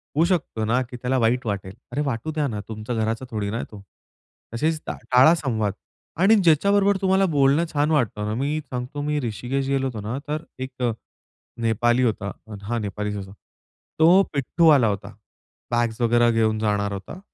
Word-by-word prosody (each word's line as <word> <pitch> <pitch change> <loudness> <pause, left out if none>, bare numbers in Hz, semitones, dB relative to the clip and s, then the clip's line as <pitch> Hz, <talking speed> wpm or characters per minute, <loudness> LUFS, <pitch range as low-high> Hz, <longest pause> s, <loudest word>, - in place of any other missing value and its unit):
होऊ 160 - +4
शकतो 160 - -1
ना 120 +4 +2
की 125 - -8
त्याला 130 +1 0
वाईट 120 +2 +1
वाटेल. 100 -2 -3 0.2
अरे 145 - -1
वाटू 135 +2 -2
द्या 150 -2 -1
ना, 105 -4 -4
तुमच्या 110 +2 -5
घराचा 110 +3 -1
थोडी 105 -2 -2
ना 115 +3 -2
तो. 105 - -10 0.7
तसेच 155 +7 0
टा - - -3 0.2
टाळा 130 +6 +7
संवाद 110 - -1 0.5
आणि 215 +4 +6
ज्याच्याबरोबर 200 +5 +4
तुम्हाला 190 0 +3
बोलणं 140 +3 +3
छान 145 +1 +1
वाटतं 115 -8 0
ना 105 - -2
मी 150 +3 0
सांगतो 125 +3 -4
मी 150 0 -1
ऋषिकेश 125 +4 -3
गेलो 135 -1 0
होतो 115 -5 -5
ना 110 +5 -4
तर 155 +2 -3 0.2
एक 130 -1 -7 0.8
नेपाली 120 +2 +2
होता, 105 -4 0 0.3
हा 120 +4 -2
नेपालीचं 105 -1 -3
होता. 95 -1 -8 0.7
तो 175 +5 +6
पिट्टू 150 +4 +2
आला 140 -7 +6
होता. 100 0 -4 0.6
बॅग्स 120 -1 0
वगैरे 120 0 +4
घेऊन 110 -1 +1
जाणार 105 -1 0
होता. 100 - -7
125 Hz, 175 wpm, -23 LUFS, 110-150 Hz, 0.8 s, टाळा